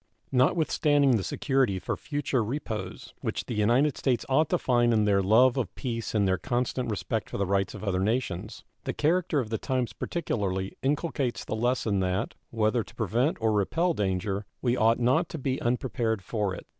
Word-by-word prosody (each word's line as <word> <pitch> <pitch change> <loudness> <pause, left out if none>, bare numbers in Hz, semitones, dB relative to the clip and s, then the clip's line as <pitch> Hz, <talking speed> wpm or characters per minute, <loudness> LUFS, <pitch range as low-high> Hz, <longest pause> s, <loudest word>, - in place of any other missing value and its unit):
Notwithstanding 145 +1 +3
the 110 -5 +2
security 130 - +1
for - - -3
future 145 -4 -1
repose 110 -6 -5
which - - -3
the - - -4
United 120 +7 +2
States 125 -4 0
ought 150 +3 +2
to 180 - +2
find 120 -5 +2
in 105 -1 +3
their 100 -1 +3
love 120 +7 +5
of 120 -8 -2
peace 115 -3 -4
and 100 -2 +3
their 95 -1 +1
constant 125 -1 -1
respect 110 +1 -2
for - - -4
the 100 - 0
rights 95 +1 0
of 105 - -8
other 95 -3 0
nations, 105 -2 -2 0.2
the - - -1
character 165 0 +1
of 115 -4 -3
the 110 - -1
times 130 -2 -1
particularly 95 - -2
inculcates 140 -2 -1
the - - -3
lesson 115 -3 +1
that, 95 0 -1 0.2
whether 115 +1 +1
to - - -17
prevent 120 - 0
or 110 -1 +2
repel 165 - +1
danger, 95 - -1 0.2
we 120 -1 +1
ought 115 -1 +3
not 140 +8 +2
to - - -5
be 135 -2 -2
unprepared 120 -3 -1
for 100 -1 -2
it. - - -10
120 Hz, 185 wpm, -27 LUFS, 105-135 Hz, 0.2 s, love